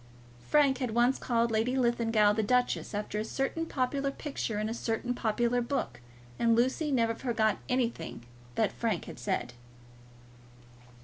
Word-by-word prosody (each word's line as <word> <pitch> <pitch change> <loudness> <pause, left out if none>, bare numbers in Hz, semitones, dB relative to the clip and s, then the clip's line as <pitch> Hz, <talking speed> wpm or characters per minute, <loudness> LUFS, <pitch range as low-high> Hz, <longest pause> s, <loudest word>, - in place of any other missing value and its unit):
Frank 280 -3 +4
had 245 -4 -2
once 240 +2 +3
called 235 -1 +1
Lady 230 +4 +1
Linlithgow 230 -4 +3
the 220 - +1
duchess, 245 -1 +1
after 210 0 -3
a - - -1
certain 270 +8 -2
popular 275 +1 -1
picture 275 -6 -4
in 215 - -1
a 225 - -2
certain 235 +1 -2
popular 240 +1 +1
book, 240 - -3 0.4
and 230 -1 +4
Lucy 260 +6 +1
never 230 -3 +2
forgot 225 -3 0
anything 235 - -2 0.3
that 215 -3 +2
Frank 220 -7 -2
had - - -9
said. 120 0 -2
235 Hz, 145 wpm, -30 LUFS, 220-255 Hz, 0.4 s, Frank